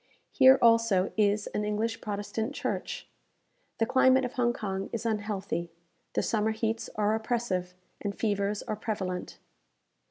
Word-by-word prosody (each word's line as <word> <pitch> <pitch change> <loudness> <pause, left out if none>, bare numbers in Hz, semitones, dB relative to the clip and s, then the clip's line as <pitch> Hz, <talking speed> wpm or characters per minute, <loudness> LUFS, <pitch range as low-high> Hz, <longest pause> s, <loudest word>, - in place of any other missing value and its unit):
Here 265 -1 +7
also 230 -5 +4
is 205 -1 +2
an 210 - -1
English 215 +2 -1
Protestant 215 +5 -3
church. - - -3 0.7
The 225 - +2
climate 260 +1 +4
of 250 - -5
Hong 245 -3 +2
Kong 195 -4 -4
is 230 0 -4
unhealthy. 205 -5 -2 0.4
The - - +1
summer 220 -1 +1
heats 225 +1 -2
are 210 0 +2
oppressive, 220 -6 -1 0.3
and 200 -1 -3
fevers 205 -1 0
are - - -3
prevalent. 190 -4 -4
215 Hz, 135 wpm, -29 LUFS, 200-230 Hz, 0.7 s, Here